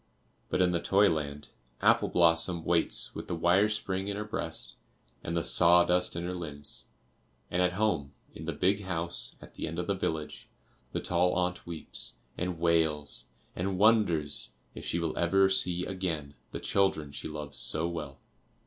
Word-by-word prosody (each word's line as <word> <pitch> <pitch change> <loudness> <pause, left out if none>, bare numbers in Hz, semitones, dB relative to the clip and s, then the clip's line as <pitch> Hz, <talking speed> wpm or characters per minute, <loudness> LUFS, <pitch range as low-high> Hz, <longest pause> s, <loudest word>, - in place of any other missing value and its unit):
But - - +1
in 90 - +2
the 85 -1 0
toy 100 +1 +4
land 75 -2 -4 0.3
Apple - - +4
blossom 85 0 +3
waits 85 -1 +3
with - - -7
the - - -2
wire 90 +5 +3
spring 95 -3 -2
in 100 0 -3
her 105 - -2
breast 85 -6 -3 0.5
and 85 +1 -2
the 85 - 0
sawdust 90 +1 +5
in 85 - -3
her 90 +1 -3
limbs; 75 -5 -5 0.7
and 90 - +1
at 90 0 +2
home, 85 -9 0 0.2
in 80 - -9
the 80 - -1
big 95 +6 +1
house 85 -1 0
at - - -14
the - - -5
end 80 +1 -5
of 90 - -2
the 100 - 0
village, 80 -5 -4 0.4
the - - -3
tall 90 +1 +1
aunt 90 0 -1
weeps 85 -2 -4 0.2
and 90 -1 -3
wails 80 -3 +1 0.3
and 95 +1 -2
wonders 100 -9 +2 0.2
if - - -9
she - - -1
will 85 -2 -2
ever 95 +3 +4
see 90 -2 +1
again 85 -7 -3 0.2
the - - -5
children 95 -7 0
she - - -6
loves 75 -2 -3
so 80 +2 +1
well. 75 -5 -6
85 Hz, 175 wpm, -30 LUFS, 80-95 Hz, 0.7 s, sawdust